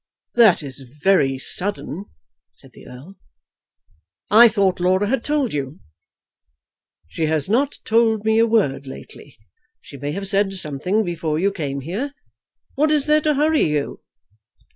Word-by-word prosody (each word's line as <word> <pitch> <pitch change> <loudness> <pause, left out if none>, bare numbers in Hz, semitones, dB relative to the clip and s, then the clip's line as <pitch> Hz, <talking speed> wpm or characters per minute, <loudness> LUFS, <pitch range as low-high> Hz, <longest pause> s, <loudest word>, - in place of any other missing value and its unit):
"That 220 -9 +5
is 135 -1 -5
very 140 +1 +1
sudden," 190 +4 -4 0.5
said - - -20
the - - -15
Earl. 145 +10 -13 1.1
"I 230 +3 +9
thought 200 -5 +1
Laura 185 +3 +2
had 245 +1 -1
told 290 -6 -1
you." 140 +1 -4 1.3
"She 160 - -2
has 155 -2 -1
not 265 +8 0
told 225 -1 +2
me 220 0 +3
a 230 - +4
word 145 -12 0
lately. 135 +1 -12 0.4
She 140 - -13
may 145 +1 -4
have 195 +2 -4
said 195 0 0
something 185 +4 -2
before 165 -4 -3
you 195 +5 +1
came 140 -7 -4
here. 210 - -4 0.6
What 305 +3 +1
is 300 -2 +1
there 305 0 +3
to 300 -1 +1
hurry 305 +2 +2
you?" 150 -1 -3
195 Hz, 145 wpm, -21 LUFS, 150-230 Hz, 1.3 s, I